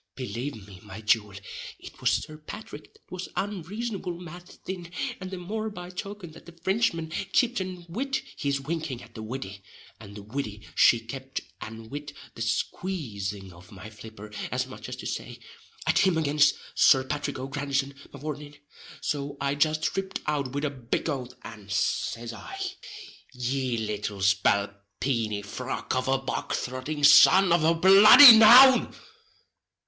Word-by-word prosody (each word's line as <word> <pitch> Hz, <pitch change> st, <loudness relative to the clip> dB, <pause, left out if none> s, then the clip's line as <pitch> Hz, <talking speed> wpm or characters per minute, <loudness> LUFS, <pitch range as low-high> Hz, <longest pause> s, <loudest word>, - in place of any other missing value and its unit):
Belave 125 Hz, -3 st, -6 dB
me, 95 Hz, -3 st, -13 dB
my 95 Hz, -, -10 dB
jewel, 105 Hz, -2 st, +1 dB, 0.4 s
it -, -, -13 dB
was -, -, +3 dB
Sir 155 Hz, 0 st, -2 dB
Pathrick 210 Hz, +8 st, -10 dB
that 430 Hz, -, -27 dB
was 185 Hz, 0 st, -6 dB
unreasonable 200 Hz, -1 st, -4 dB
mad 175 Hz, +1 st, -11 dB, 0.2 s
thin, 175 Hz, -2 st, -6 dB, 0.3 s
and 185 Hz, -1 st, -7 dB
the 190 Hz, -, -6 dB
more 215 Hz, +5 st, -4 dB
by 180 Hz, -3 st, -9 dB
token 195 Hz, -2 st, -7 dB
that 165 Hz, -, -16 dB
the 170 Hz, -, -12 dB
Frinchman 170 Hz, -2 st, -1 dB, 0.2 s
kipt 245 Hz, -2 st, +2 dB
an 185 Hz, -2 st, -6 dB
wid 270 Hz, +10 st, -2 dB, 0.2 s
his 140 Hz, -1 st, -1 dB
winking 150 Hz, -3 st, -5 dB
at 115 Hz, -, -16 dB
the 110 Hz, -, -8 dB
widdy; 110 Hz, -4 st, -7 dB, 0.4 s
and 100 Hz, +1 st, -12 dB
the 105 Hz, -, -9 dB
widdy 105 Hz, -2 st, -6 dB
she 120 Hz, -, +5 dB
kept 130 Hz, +3 st, -7 dB, 0.2 s
an 110 Hz, 0 st, -9 dB
wid 145 Hz, 0 st, -7 dB, 0.2 s
the -, -, -10 dB
squazing 110 Hz, -, -3 dB
of 90 Hz, +4 st, -17 dB
my 100 Hz, +2 st, -11 dB
flipper, 105 Hz, 0 st, -12 dB, 0.2 s
as 125 Hz, 0 st, -1 dB
much 130 Hz, -, -10 dB
as -, -, -5 dB
to -, -, -10 dB
say, -, -, -5 dB, 0.5 s
"At -, -, +2 dB
him 185 Hz, -4 st, +3 dB
again, 150 Hz, -1 st, -1 dB, 0.3 s
Sir 135 Hz, -2 st, +5 dB
Pathrick 145 Hz, +1 st, -4 dB
O'Grandison, 140 Hz, +1 st, -2 dB, 0.2 s
mavourneen:" 145 Hz, 0 st, -7 dB, 0.4 s
so 140 Hz, -1 st, -3 dB
I 140 Hz, 0 st, 0 dB
just 155 Hz, +1 st, 0 dB
ripped 195 Hz, 0 st, -3 dB
out 140 Hz, -4 st, -2 dB
wid 145 Hz, +2 st, -2 dB
a 145 Hz, -, -1 dB
big 130 Hz, +3 st, -3 dB
oath, 125 Hz, -3 st, -6 dB
and 105 Hz, -3 st, -11 dB
says 110 Hz, +3 st, -2 dB
I: 390 Hz, -, -9 dB, 0.7 s
"Ye 125 Hz, 0 st, -2 dB
little 105 Hz, -2 st, -4 dB
spalpeeny 100 Hz, +3 st, 0 dB
frog 125 Hz, +6 st, -5 dB
of 130 Hz, -, -1 dB
a 135 Hz, 0 st, +2 dB
bog 135 Hz, 0 st, -4 dB
throtting 130 Hz, +4 st, -5 dB
son 180 Hz, +6 st, +7 dB
of 170 Hz, -2 st, +2 dB
a 165 Hz, +1 st, +3 dB
bloody 205 Hz, -, +10 dB
noun!" 250 Hz, +4 st, +8 dB
140 Hz, 155 wpm, -26 LUFS, 115-175 Hz, 0.7 s, bloody